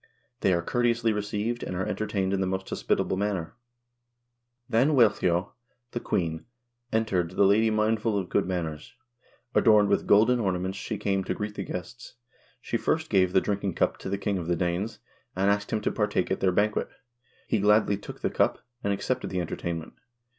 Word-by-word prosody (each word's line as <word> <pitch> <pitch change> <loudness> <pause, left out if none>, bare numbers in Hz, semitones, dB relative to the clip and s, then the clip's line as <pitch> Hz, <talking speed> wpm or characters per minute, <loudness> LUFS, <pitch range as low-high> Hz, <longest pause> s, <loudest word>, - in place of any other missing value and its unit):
They 95 - +2
are 85 -1 +1
courteously 115 +1 +1
received, 105 +3 -2
and - - -4
are 95 +1 -1
entertained 100 -3 -1
in 95 - 0
the 95 - 0
most 95 0 -3
hospitable 95 - 0
manner. 95 -4 -2 1.1
"Then 135 +7 +3
Wealhtheow, 100 -6 +3 0.4
the 120 - -3
queen, 80 -8 -2 0.5
entered, 95 -6 0
the - - +4
lady 105 +3 +4
mindful 110 0 +1
of 95 -3 -2
good 100 - +1
manners. 85 +4 -4 0.6
Adorned 105 -2 +5
with - - +1
golden 115 +4 +5
ornaments 95 -2 -1
she - - -4
came 95 -1 0
to - - -2
greet 105 0 -4
the 100 - -4
guests. 115 +8 -7 0.5
She 115 - -1
first 160 +6 -1
gave 95 -3 +4
the 95 - +4
drinking 100 -3 -2
cup - - +1
to - - -6
the 100 - -1
king 100 -1 -1
of 85 - -5
the 85 - +1
Danes, 90 +5 -2 0.4
and 95 +2 +3
asked 100 0 -1
him 110 - 0
to - - 0
partake 105 -4 0
of 95 - 0
their 95 - +2
banquet. 105 +4 +1 0.6
He 110 - 0
gladly 105 0 +4
took 100 - -10
the - - 0
cup, - - +1 0.2
and 100 - +1
accepted 125 +6 -2
the 90 - -2
entertainment. 85 -1 -4
100 Hz, 185 wpm, -27 LUFS, 95-110 Hz, 1.1 s, Adorned